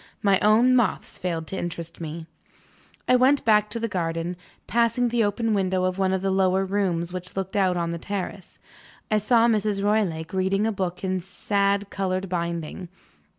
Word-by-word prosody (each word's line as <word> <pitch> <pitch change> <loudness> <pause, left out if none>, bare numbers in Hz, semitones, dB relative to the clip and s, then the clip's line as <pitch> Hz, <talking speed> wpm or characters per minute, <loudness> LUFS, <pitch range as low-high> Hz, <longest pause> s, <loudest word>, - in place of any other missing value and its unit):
My 200 -2 +4
own 230 +5 +4
moths 240 -5 0
failed 165 -3 -2
to - - -4
interest 170 -1 -6
me. 160 0 -6 0.8
I 255 - +5
went 265 +3 +3
back 210 -1 +4
to 230 - -3
the 230 - -1
garden. 170 -2 -2 0.3
Passing 235 +1 +1
the 235 -1 +2
open 220 +2 0
window 185 -2 +1
of 185 +1 -1
one 190 -1 +2
of 190 0 -1
the 195 - +1
lower 190 0 +2
rooms 180 -3 -1
which 180 0 -7
looked 190 -1 -4
out 185 -3 +2
on 170 -1 -1
the 170 - -4
terrace, 200 0 -5 0.5
I 215 - +4
saw 230 +2 +4
Mrs. 210 -3 +1
Roylake 190 -6 0
reading 190 +2 +1
a 225 - +1
book 185 -3 -3
in 185 -1 0
sad 200 +2 -1
colored 190 -1 -2
binding. 170 0 -3
195 Hz, 180 wpm, -25 LUFS, 180-210 Hz, 0.8 s, I